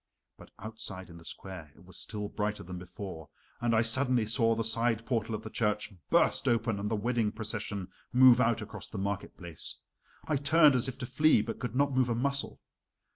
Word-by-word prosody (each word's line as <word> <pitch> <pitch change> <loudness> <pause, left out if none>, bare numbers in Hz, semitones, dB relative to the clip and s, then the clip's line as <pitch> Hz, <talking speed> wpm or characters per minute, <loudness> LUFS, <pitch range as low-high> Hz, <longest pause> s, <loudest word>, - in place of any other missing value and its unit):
But - - -15
outside 100 -4 -7
in 85 - -11
the - - -15
square 85 -2 -8
it 90 - -18
was 95 -1 -12
still 105 +2 -4
brighter 105 +1 -3
than 90 0 -7
before, 90 -3 -8 0.3
and 120 -1 +1
I 110 - +4
suddenly 125 0 +2
saw 115 +1 +2
the 115 - -1
side 115 0 +2
portal 115 -2 -1
of - - -7
the 110 - -8
church 105 -1 -1 0.2
burst - - +3
open 115 -3 +1
and 105 +1 -2
the 110 - 0
wedding 115 0 0
procession 105 -3 -4 0.2
move 125 0 +7
out 115 -1 +2
across - - -7
the - - -8
market 100 0 -3
place. 85 -3 -5 0.5
I 150 - +1
turned 150 +1 +5
as 125 +1 +3
if 130 - -5
to 130 - -5
flee, 135 -2 +3
but 115 +1 -5
could 125 -1 -4
not 140 +1 +2
move 130 -1 +2
a 115 - +1
muscle. 140 +3 -1
115 Hz, 205 wpm, -30 LUFS, 100-125 Hz, 0.5 s, move